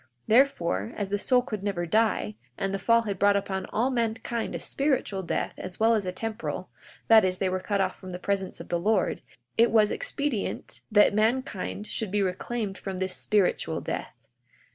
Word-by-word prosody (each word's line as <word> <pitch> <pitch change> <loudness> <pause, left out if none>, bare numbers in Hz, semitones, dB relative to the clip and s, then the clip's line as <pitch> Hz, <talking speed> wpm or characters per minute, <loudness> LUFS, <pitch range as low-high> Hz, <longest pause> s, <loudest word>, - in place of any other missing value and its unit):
42:9 130 - -33 0.2
Therefore, 175 - +2
as 205 -2 -2
the 205 0 0
soul 250 +3 +3
could 215 -5 -5
never 195 -4 -2
die, 195 - +1 0.2
and 195 0 -2
the 195 - -1
fall 230 +3 +4
had 200 -4 -4
brought 200 0 +5
upon 190 -1 -2
all 245 +5 0
mankind 230 -1 -2
a - - -3
spiritual 265 -9 0
death 180 - -2
as 185 -1 -6
well 225 +1 +5
as 210 -4 0
a - - 0
temporal, 225 +4 -5 0.4
that 220 -2 +8
is, 185 -1 +1
they 190 - 0
were 185 0 -1
cut 200 +2 -1
off 190 -1 0
from 185 - -9
the 180 - -5
presence 195 0 -2
of - - -9
the 175 - 0
Lord, 200 0 +1 0.4
it 230 +1 +6
was 215 -2 +4
expedient 290 - -3
that 210 -1 +6
mankind 215 -2 0
should 220 -1 -3
be 205 +1 +1
reclaimed 195 +2 -3
from 190 -2 -5
this 185 0 -1
spiritual 205 -4 +1
death. - - -5
205 Hz, 195 wpm, -27 LUFS, 185-225 Hz, 0.4 s, that